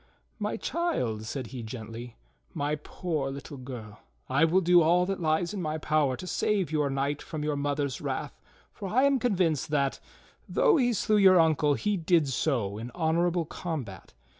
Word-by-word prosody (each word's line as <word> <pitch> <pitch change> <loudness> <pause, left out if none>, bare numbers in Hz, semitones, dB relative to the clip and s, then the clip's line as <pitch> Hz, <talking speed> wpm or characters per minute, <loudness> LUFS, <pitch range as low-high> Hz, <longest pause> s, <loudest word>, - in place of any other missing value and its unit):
"]\Iy - - -2
child," 125 - -1
said 130 +3 -4
he 125 - -5
gently, 115 +1 -8 0.4
"my 145 +1 -1
poor 150 -1 -3
little 140 +1 -8
girl, 120 -5 -8 0.3
I 140 +5 +3
will 170 +3 +3
do 175 -1 +5
all 175 +3 +4
that 195 +1 -2
lies 160 +3 +1
in 200 - -3
my 155 -1 -2
power 150 -4 +1
to - - -7
save 190 0 0
your 150 -2 +1
knight 140 +1 -1
from 155 -2 -5
your 150 -1 0
mother's 145 -1 -2
wrath, - - -4 0.3
for 195 - -6
I 255 +6 +3
am 280 -1 +4
convinced 175 - +1
that, 140 -2 0 0.5
tliough 295 - +4
he 245 -1 +2
slew 215 +1 +2
your 190 -3 +7
uncle, 155 -3 +3
he 205 - 0
did 165 -3 +2
so 115 -7 -1
in 115 +2 -6
honorable 170 +1 +1
combat. 135 - -6
155 Hz, 175 wpm, -28 LUFS, 135-180 Hz, 0.5 s, your